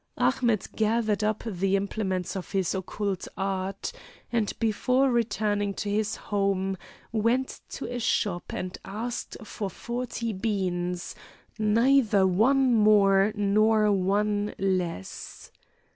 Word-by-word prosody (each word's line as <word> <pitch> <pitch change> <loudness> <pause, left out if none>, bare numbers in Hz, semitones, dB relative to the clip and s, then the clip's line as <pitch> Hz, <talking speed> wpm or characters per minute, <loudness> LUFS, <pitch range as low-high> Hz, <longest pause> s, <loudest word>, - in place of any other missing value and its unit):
Ahmet 235 -6 +1
gathered 215 -1 +1
up 215 0 0
the 195 -2 0
implements 195 -2 -2
of 190 +1 -6
his 190 -3 +1
occult 195 0 -3
art, 195 0 -2 0.4
and 230 -4 +1
before 250 +4 +2
returning 205 -3 0
to 205 - -3
his 210 0 0
home, 195 -1 -1 0.4
went 230 +4 0
to - - -6
a 245 0 -4
shop 190 -6 0
and 185 0 -4
asked 225 +5 -5
for 210 -2 -5
forty 235 +2 -4
beans 180 -4 -2 0.5
neither 220 -1 +4
one 245 +8 +3
more 205 -2 +5
nor 210 +1 +3
one 205 +2 +1
less. 180 - -3
205 Hz, 115 wpm, -27 LUFS, 195-225 Hz, 0.5 s, more